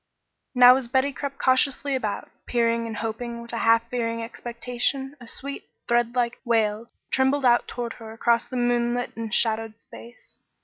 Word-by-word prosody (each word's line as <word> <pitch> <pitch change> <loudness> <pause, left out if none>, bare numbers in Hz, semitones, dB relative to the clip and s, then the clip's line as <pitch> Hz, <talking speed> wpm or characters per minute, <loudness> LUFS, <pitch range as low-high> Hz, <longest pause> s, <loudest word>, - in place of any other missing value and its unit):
Now 250 +1 +8
as 265 -3 -3
Betty 265 +3 +1
crept 275 0 -5
cautiously 270 +1 +2
about, 220 -6 -3 0.2
peering 230 -1 +1
and 220 -2 -5
hoping 235 +2 -4
with 235 0 -10
a 230 - -2
half 230 0 +3
fearing 230 -2 -2
expectation, 245 +4 -3
a 240 - -11
sweet, 280 +4 -7 0.2
threadlike 240 0 +1
wail 225 -2 0 0.2
trembled 265 +1 +2
out 240 -1 +4
toward 240 -1 -4
her 220 -1 -8
across 230 +1 +1
the 255 - -5
moonlit 240 0 0
and 225 -1 -5
shadowed 225 0 0
space. 235 +1 -14
240 Hz, 160 wpm, -25 LUFS, 230-255 Hz, 0.2 s, Now